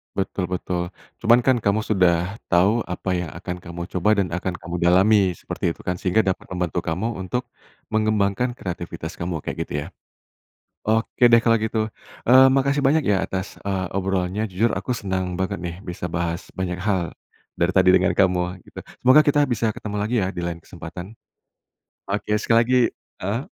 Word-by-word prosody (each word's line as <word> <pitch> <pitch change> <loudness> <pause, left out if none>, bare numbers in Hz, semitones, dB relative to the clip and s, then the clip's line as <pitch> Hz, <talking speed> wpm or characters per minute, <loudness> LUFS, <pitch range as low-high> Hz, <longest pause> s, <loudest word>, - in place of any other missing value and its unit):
Betul 95 -1 -1
betul. 90 -1 -2 0.4
Cuman 115 +2 +5
kan, 130 -2 +4
kamu 105 +1 +1
sudah 90 -1 +2
tahu, 95 +6 +3
apa 90 +2 -4
yang 90 -3 -4
akan 90 +1 -5
kamu 85 0 -8 0.2
coba, 105 +4 +2
dan 100 -2 +2
akan 90 +1 -2
kamu 85 0 -6
dalami, 95 +2 +4
seperti 85 - -3
itu - - -14
kan? 90 - -1
Sehingga, 95 +4 +2
dapat 95 -1 -2
membantu 90 -1 -1
kamu 90 +8 -1
untuk 125 +7 -2 0.5
mengembangkan 110 +2 +1
kreativitas 85 -4 -6
kamu, 85 -3 -3
kayak - - -4
gitu, - - -8
ya? - - -8 1.0
Oke 115 +2 +3
deh, 115 - +8
kalau 115 0 +3
gitu, 110 0 -1 0.4
mmm, 130 +2 +8
makasih 140 +1 +2
banyak 145 -3 +3
ya 95 -2 +2
atas, 95 0 -5
eee, 95 -2 -1
obrolnya. 95 +2 -1
Jujur, 105 +2 0
aku 95 +6 -2
senang 95 -5 -2
banget 95 +1 -1
nih, 85 -1 -4
bisa 90 -2 -6
bahas 85 0 -3
banyak 90 -1 -3
hal, 90 -3 0 0.5
dari - - +1
tadi - - +4
dengan - - +4
kamu, 90 -1 +1
gitu. - - -11 0.2
Semoga, 130 +4 +7
kita 145 0 +3
bisa 115 -2 0
ketemu 105 0 -6
lagi 110 +4 -1
ya, 95 - 0
di - - -4
lain 85 -1 -4
kesempatan. 90 +4 -9 0.9
Oke 105 +1 -1
sekali 115 0 +2
lagi 125 +2 +3 0.4
heeh, 100 +6 -1
95 Hz, 175 wpm, -23 LUFS, 90-110 Hz, 1.0 s, deh